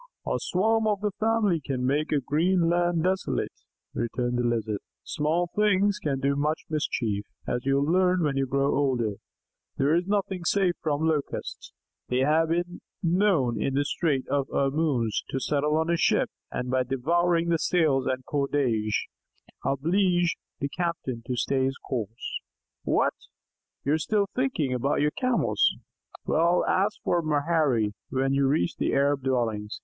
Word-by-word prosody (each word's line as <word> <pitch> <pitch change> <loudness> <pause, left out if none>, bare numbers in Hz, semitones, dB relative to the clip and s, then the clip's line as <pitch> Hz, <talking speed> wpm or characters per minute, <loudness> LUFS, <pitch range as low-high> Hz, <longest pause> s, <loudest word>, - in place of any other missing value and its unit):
"A - - 0
swarm 220 +4 +1
of 205 -2 0
his 210 - +1
family 215 -6 +2
can 130 -3 -2
make 145 +4 0
a 150 - +3
green 165 +6 +2
land 175 -1 +1
desolate," 190 +1 -1 0.4
returned 120 +1 -1
the - - +1
Lizard. 110 -3 -1 0.2
"Small 165 +3 -1
things 205 -1 +2
can 140 -3 -1
do 140 +1 +1
much 150 +2 -1
mischief, 115 -9 -1 0.2
as 125 +2 -3
you 135 - +3
will 140 +3 +1
learn 185 -1 +3
when 145 -3 0
you 135 0 0
grow 140 +2 +1
older. 125 -7 0 0.6
There 140 +3 +2
is 175 +2 +1
nothing 195 -3 -1
safe 185 0 +2
from 155 0 0
Locusts. 155 -3 -3 0.4
They 125 +1 +1
have 155 +4 +3
even 175 +1 -2 0.2
been 170 +1 +2
known 135 - +2
in 135 - 0
the 145 +1 +1
Strait 140 -4 0
of 140 -1 0
Ormuz 135 -6 0
to 135 - -2
settle 150 +3 +1
on 160 +1 +1
a 170 - +2
ship, - - +2 0.2
and, 125 0 -3
by 130 0 +2
devouring 165 +7 +1
the 165 -1 +2
sails 150 -5 +2
and 130 0 -2
cordage, 135 -7 0 0.6
oblige 175 +5 +1 0.2
the 140 - -2
captain 165 -8 -3
to 125 - -1
stay 130 +3 +1
his 135 +1 -2
course. 115 -4 -4 0.4
What? - - +1 0.7
You 140 - +2
are - - +3
still 205 +6 +1
thinking 245 - 0
about 135 +3 0
your 150 0 +2
Camels? 255 - +1 0.5
Well, 170 +2 +2
ask 200 +2 +1
for 175 - +1
'Maherry' 145 -8 +1 0.2
when 135 +1 0
you 140 0 +3
reach 155 +5 0
the - - 0
Arabs' 140 0 +2
dwellings. 110 -5 -1
150 Hz, 165 wpm, -26 LUFS, 130-175 Hz, 0.7 s, a